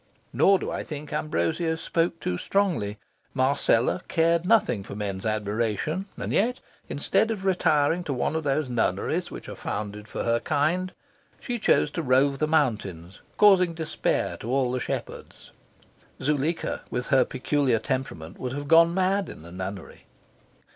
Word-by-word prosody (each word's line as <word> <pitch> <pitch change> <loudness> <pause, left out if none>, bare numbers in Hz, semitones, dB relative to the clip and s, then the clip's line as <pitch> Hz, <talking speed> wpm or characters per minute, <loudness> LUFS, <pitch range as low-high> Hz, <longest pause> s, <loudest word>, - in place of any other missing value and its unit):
Nor 195 0 +5
do - - -4
I - - -3
think 150 -1 -7
Ambrosio 155 - 0
spoke 165 +1 -1
too 90 - -2
strongly. 170 - 0 0.4
Marcella 130 +2 +2
cared 165 +1 +2
nothing 190 - +3
for 100 - -8
men's 100 -1 -3
admiration, 110 - -1
and - - -3
yet, 245 +5 +1 0.3
instead 220 - +1
of 205 -4 -3
retiring 170 -3 +2
to 150 - -3
one 130 +4 -1
of 160 - -1
those 145 0 0
nunneries 120 -2 -1
which - - -9
are - - -6
founded 105 0 -5
for - - -4
her 115 0 +2
kind, 160 +7 0 0.5
she 240 -2 -4
chose 150 -7 +3
to 165 - -2
rove 135 0 +2
the 155 - +1
mountains, 105 - -1 0.2
causing 185 -5 +5
despair 160 -1 -1
to 115 - -7
all 130 -2 +1
the 130 - -1
shepherds. - - -6 0.7
Zuleika, 150 +3 -1
with 125 0 -3
her 135 -2 +5
peculiar 130 -1 0
temperament, 110 -9 -4
would 125 0 -4
have 145 +1 -5
gone 165 +2 +6
mad 190 +1 +1
in 80 - -10
a 85 - -11
nunnery. 95 0 -7
145 Hz, 155 wpm, -26 LUFS, 115-170 Hz, 0.7 s, gone